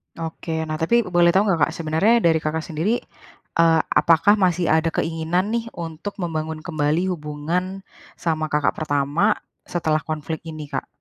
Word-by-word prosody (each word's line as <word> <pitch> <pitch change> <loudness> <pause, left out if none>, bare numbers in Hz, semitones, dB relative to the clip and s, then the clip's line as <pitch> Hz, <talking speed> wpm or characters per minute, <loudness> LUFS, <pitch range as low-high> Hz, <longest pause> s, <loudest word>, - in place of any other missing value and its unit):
Oke, 160 0 -4
nah, 155 -1 -4
tapi 235 +9 +3
boleh 175 -3 +3
tahu 195 - +5
nggak 170 -8 +2
Kak, 160 - -6
sebenarnya 170 +9 +2
dari 165 -1 +4
Kakak 155 +1 -2
sendiri, 170 +10 -1 0.6
eee, 165 -1 +5
apakah 170 +6 +4
masih 180 -3 +2
ada 160 +1 +3
keinginan 165 +5 -1
nih, 230 0 -1
untuk 170 +4 -6
membangun 160 -1 -3
kembali 160 +3 0
hubungan 170 +5 -3 0.3
sama 155 -2 -1
kakak 150 -2 +1
pertama 150 +7 +1 0.3
setelah 160 -3 0
konflik 155 0 -4
ini 155 -2 -7
Kak? - - -3
160 Hz, 155 wpm, -22 LUFS, 155-180 Hz, 0.6 s, tahu